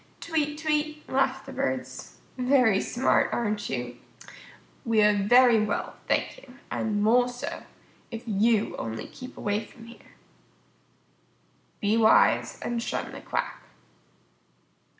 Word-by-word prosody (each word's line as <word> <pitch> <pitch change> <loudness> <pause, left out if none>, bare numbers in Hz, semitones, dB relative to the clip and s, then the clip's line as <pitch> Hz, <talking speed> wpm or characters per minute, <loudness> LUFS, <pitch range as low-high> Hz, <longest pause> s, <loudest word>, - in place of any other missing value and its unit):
"Tweet, 300 -2 -2
tweet," 305 -1 -2
laughed 270 0 0
the 270 - -9
Birds. 265 -1 -4 0.2
"Very 250 -6 +3
smart, 255 +2 +1
aren't 210 -3 -2
you? 120 -2 -4 0.9
We 225 -2 +3
are 210 0 +5
very 225 +2 +5
well, 210 -1 -3
thank - - 0
you, 260 -2 -16 0.2
and 205 -2 -1
more 245 +3 +4
so, 245 0 -6 0.5
if 230 +1 -7
you 220 0 +1
only 110 -1 -5
keep 255 0 -11
away 205 +1 -1
from 225 +1 -15
here." 235 0 -16 1.7
_Be 210 +3 +2
wise 220 -1 +4
and 235 -1 -2
shun - - -3
the - - -9
quack. - - -3
235 Hz, 125 wpm, -26 LUFS, 210-265 Hz, 1.7 s, are